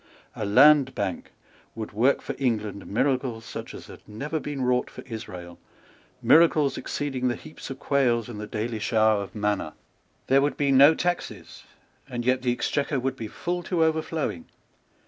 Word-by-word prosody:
A 105 - -3
Land 135 +4 +6
Bank 95 -3 -3 0.4
would 110 -1 -6
work 120 +6 +2
for 140 - -4
England 110 -6 -2
miracles 125 0 -1
such - - -7
as - - -10
had - - -13
never 145 +9 -4
been 145 -3 -4
wrought 125 0 +1
for - - -11
Israel, 90 -7 -8 0.6
miracles 155 -3 +5
exceeding 135 -3 -3
the 120 - 0
heaps 80 -3 -11
of 135 - -6
quails 120 -5 +1
and 115 -4 -8
the 105 - -6
daily 110 +1 -3
shower 110 -1 +2
of 100 - -9
manna. 105 -6 -1 0.5
There 135 +1 +4
would 145 +1 0
be 140 -1 +1
no 140 +4 +7
taxes; 175 0 -4 0.4
and 120 -2 -4
yet 130 +1 +2
the 125 -1 +1
Exchequer 140 +3 -1
would 130 +1 -2
be 115 -4 -6
full 175 +10 -3
to 170 -1 0
overflowing. 160 - -2
125 Hz, 165 wpm, -25 LUFS, 110-140 Hz, 0.6 s, no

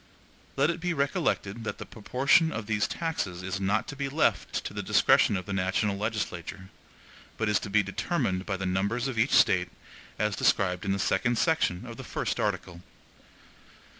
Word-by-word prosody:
Let 140 +4 +3
it 170 - -6
be 175 0 -1
recollected 140 - -1
that - - -4
the - - -7
proportion 135 +8 +2
of 115 -7 -4
these 105 -1 0
taxes 100 - -3
is 95 +1 -3
not 100 +3 0
to 145 - -6
be 140 -1 -3
left 150 +3 0
to - - -5
the - - -3
discretion 100 - +4
of 90 - -6
the 100 - -4
national 95 +2 0
legislature, 100 -3 -4 0.7
but 110 - 0
is 105 - +3
to - - -7
be 105 +1 +3
determined 95 0 -2
by 95 -2 -1
the 95 - -4
numbers 100 +7 0
of 125 -4 -3
each 120 +5 +3
State, 95 -8 +4 0.5
as 105 0 0
described 90 0 +1
in 100 - 0
the 100 - +1
second 120 +5 +1
section 150 - +1
of - - -9
the - - -7
first - - -3
article. 85 -1 -2
105 Hz, 185 wpm, -28 LUFS, 95-130 Hz, 0.7 s, discretion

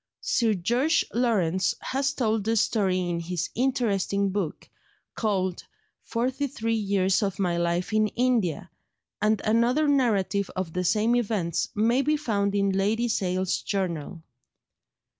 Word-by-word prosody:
Sir 225 -3 +1
George 240 - +1
Lawrence 200 -7 +1
has 270 +1 -1
told 225 -6 0
the 225 +2 0
story 195 -4 +1
in 170 -1 -2
his 170 0 -3
interesting 205 -6 0
book 185 -5 -3 0.5
called 190 -5 -1 0.4
Forty 255 +4 -2
three 230 -3 -2
Years 195 -3 +1
of 195 -2 -1
my 180 -3 0
Life 170 +3 -1
in 215 0 +3
India, 230 - 0 0.5
and 215 0 +2
another 235 +7 +2
narrative 210 -8 +1
of 185 -3 -3
the 180 - -1
same 215 +6 +2
events 200 -8 -1
may 230 +5 +3
be 300 +2 +1
found 205 -8 -1
in 200 -1 +2
Lady 210 +5 +1
Sale's 185 -4 -1
Journal. 170 -4 -3
205 Hz, 135 wpm, -26 LUFS, 185-235 Hz, 0.5 s, in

